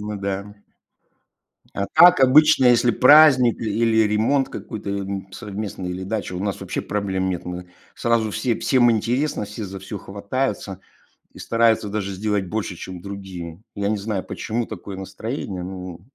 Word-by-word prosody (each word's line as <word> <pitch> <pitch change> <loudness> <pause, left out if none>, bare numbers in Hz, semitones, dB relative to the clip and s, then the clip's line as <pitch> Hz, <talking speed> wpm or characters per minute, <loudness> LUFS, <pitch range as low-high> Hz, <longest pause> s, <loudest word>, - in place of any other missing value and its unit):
Ну 105 0 -5
да. 100 -1 0 1.4
А 100 - -1
так, 175 0 +8
обычно, 135 +1 +6
если 120 0 +5
праздник, 130 -2 +6
и 110 - -2
или 115 -1 +3
ремонт 130 +6 +1
какой-то, 105 -5 -7
м, 100 -1 -4
совместный, 100 -3 -6
или 90 +1 -5
дача, 100 -2 -4
у 90 - -4
нас 100 -2 -3
вообще - - -3
проблем 95 -2 -2
нет. 90 - -4
Мы 90 0 -7 0.2
сразу 115 -2 +1
все 120 -3 -1
всем 120 -3 +3
интересно, 115 +3 0
все 105 +2 -7
за 95 0 -7
всё 95 +2 -7
хватаются 100 -1 -4 0.5
и - - -14
стараются 115 -2 +2
даже 100 -1 -3
сделать 100 0 -1
больше, 105 -3 -3
чем 90 +1 -8
другие. 95 -2 -8
Я 100 0 -1
не 105 -1 0
знаю, 100 -2 -3
почему 115 +1 -3
такое 100 -1 -8
настроение, 95 0 -5
ну 90 -2 -7
105 Hz, 160 wpm, -22 LUFS, 95-115 Hz, 1.4 s, так